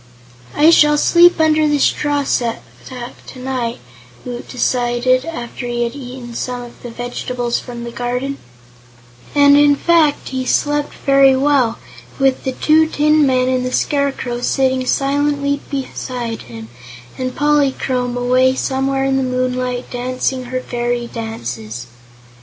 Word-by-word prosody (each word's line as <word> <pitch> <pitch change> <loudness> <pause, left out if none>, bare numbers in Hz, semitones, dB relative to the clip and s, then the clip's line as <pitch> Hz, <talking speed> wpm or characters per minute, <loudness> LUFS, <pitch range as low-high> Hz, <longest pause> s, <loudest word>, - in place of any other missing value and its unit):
"I 310 +3 +6
shall 295 -2 +5
sleep 345 +3 +5
under 310 -1 +3
the 295 0 +2
straw 290 0 +1
stack 235 -4 -1 0.7
tonight," 255 -2 -4 0.5
Woot 245 -1 -6
decided, 250 0 +1
after 245 -6 -6
he 240 0 -1
had 235 0 -3
eaten 250 -3 -8
some 245 +1 -4
of 240 - -13
the 240 - -7
vegetables 245 0 -3
from 240 -1 -8
the 235 - -6
garden, 250 +3 -3 1.0
and 285 0 +6
in 290 0 +5
fact 320 -1 +2
he 260 -1 -3
slept 290 +3 0
very 275 -1 +5
well, 265 -4 +2 0.4
with 270 -1 +1
the 265 - -1
two 315 +4 +3
tin 300 -1 +3
men 255 -1 +2
and 255 -1 0
the 255 - -3
Scarecrow 270 -4 -1
sitting 260 0 +1
silently 285 +1 0
beside 250 -4 -4
him 110 -1 -9 0.5
and 255 0 -4
Polychrome 265 -4 +1
away 255 +1 +3
somewhere 270 0 -1
in 270 0 +1
the - - +1
moonlight 255 -1 -2
dancing 255 +1 -2
her 255 +1 -3
fairy 240 -1 -2
dances. 120 - -6
255 Hz, 135 wpm, -17 LUFS, 245-285 Hz, 1.0 s, I